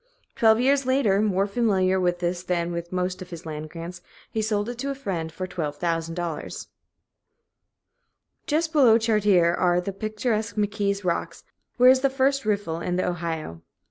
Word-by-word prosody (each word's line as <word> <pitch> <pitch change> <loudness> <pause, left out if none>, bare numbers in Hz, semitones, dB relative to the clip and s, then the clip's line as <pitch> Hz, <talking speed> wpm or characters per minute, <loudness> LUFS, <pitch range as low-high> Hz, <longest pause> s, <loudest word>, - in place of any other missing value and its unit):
Twelve 220 -1 +4
years 270 +1 +2
later, 240 -7 +3
more 200 -2 +2
familiar 195 -4 +1
with 175 -1 0
this 175 0 -1
than 175 -1 -1
with 170 0 -5
most 185 0 -2
of 180 - -8
his 170 -1 -9
land 155 -1 -6
grants, 170 +2 -8 0.3
he 220 - -1
sold 210 -1 -1
it 240 0 -6
to 275 - -2
a 275 - -2
friend 180 -11 -4
for 185 +3 -5
$12,000. 165 0 -3 1.8
Just 320 +1 0
below 250 -7 +6
Chartier 210 -6 +3
are 175 0 +2
the 195 +2 -4
picturesque 215 +2 -2
McKee's 205 -1 -1
Rocks, 170 -1 -2 0.3
where 250 +1 +8
is 260 - +4
the 275 +1 +2
first 270 -1 +1
riffle 200 -6 -1
in 180 - -2
the 185 - 0
Ohio. 165 - -4
190 Hz, 165 wpm, -25 LUFS, 175-225 Hz, 1.8 s, where